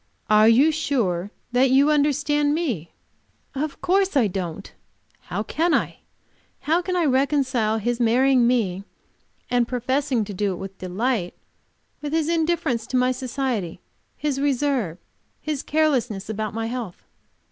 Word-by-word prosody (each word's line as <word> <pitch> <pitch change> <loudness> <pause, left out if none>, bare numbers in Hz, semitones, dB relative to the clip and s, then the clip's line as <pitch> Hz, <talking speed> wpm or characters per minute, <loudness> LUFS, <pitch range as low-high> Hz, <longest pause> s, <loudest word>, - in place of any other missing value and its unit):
Are 215 +1 +6
you 270 +8 +5
sure 230 - -1 0.2
that 255 +2 +3
you 275 +3 +4
understand 295 0 +2
me?" 240 - -3 0.6
Of 285 +2 -4
course 385 -2 +2
I 250 - +4
don't. 185 -1 -5 0.5
How - - -3
can 335 +1 +1
I? - - -2 0.6
How 330 +4 +1
can 365 +1 -3
I 350 -2 +2
reconcile 260 -5 +1
his 240 +3 -1
marrying 250 +1 +4
me 200 -7 0 0.7
and 245 -1 +2
professing 255 -1 0
to 205 - -7
do 195 0 -1
it - - -7
with 195 0 -8
delight, 185 +1 -2 0.7
with 295 0 -4
his 320 -1 +1
indifference 320 -8 0
to 255 - 0
my 250 0 +3
society, 255 -7 -3 0.4
his 285 -2 -2
reserve, 270 - 0 0.4
his 300 -3 -3
carelessness 250 -10 0
about 215 0 -4
my 225 0 -2
health? 230 -6 -5
255 Hz, 140 wpm, -23 LUFS, 215-290 Hz, 0.7 s, Are